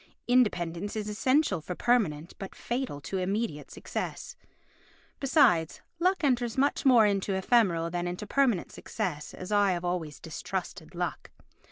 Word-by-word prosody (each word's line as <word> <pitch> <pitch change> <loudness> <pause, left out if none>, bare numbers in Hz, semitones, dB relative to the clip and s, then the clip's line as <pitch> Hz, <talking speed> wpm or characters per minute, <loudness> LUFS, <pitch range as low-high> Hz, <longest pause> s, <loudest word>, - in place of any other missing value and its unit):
Independence 205 -6 +1
is 215 -1 -3
essential 220 - +1
for 180 +4 -5
permanent 175 -11 +1
but 195 - -7
fatal 245 - -3
to 185 +7 -3
immediate 190 -5 -2
success. - - -5 0.8
Besides, 255 - +3 0.2
luck 365 0 +1
enters 245 -4 +1
much 280 +1 +2
more 240 -4 +7
into 200 -1 0
ephemeral 190 -5 +2
than 175 0 -2
into 180 +4 -4
permanent 240 -5 +1
success 150 -4 -4
and 185 +2 -8
I 205 -2 +4
have 175 0 -4
always 170 -5 -3
distrusted - - -6
luck. - - -3
205 Hz, 140 wpm, -28 LUFS, 175-245 Hz, 0.8 s, more